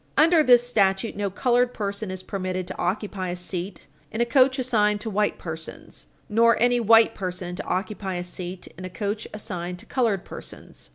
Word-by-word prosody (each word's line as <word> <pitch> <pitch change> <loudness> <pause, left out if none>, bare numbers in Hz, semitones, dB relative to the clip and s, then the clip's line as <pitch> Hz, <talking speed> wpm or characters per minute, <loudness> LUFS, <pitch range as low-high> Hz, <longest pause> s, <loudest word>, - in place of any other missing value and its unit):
Under 330 +1 +6
this 245 -4 +5
statute, 200 -2 +1
no 205 -1 -1
colored 245 +4 +1
person 200 0 -3
is 185 0 -5
permitted 185 -2 -3
to - - -7
occupy 185 0 -2
a 175 - -2
seat 180 +1 -6 0.3
in 220 - -4
a 235 - +4
coach 260 +2 +4
assigned 210 -5 +2
to 220 - -3
white 210 +1 +1
persons, 160 -1 -7 0.2
nor 230 +2 +4
any 245 +1 +4
white 225 0 +6
person 180 -2 -4
to - - -5
occupy 190 0 -2
a 175 - -2
seat 180 0 -6
in - - -7
a 185 - -5
coach 205 +4 -3
assigned 180 -4 -5
to - - -12
colored 230 -8 0
persons. - - -9
205 Hz, 185 wpm, -25 LUFS, 185-230 Hz, 0.3 s, Under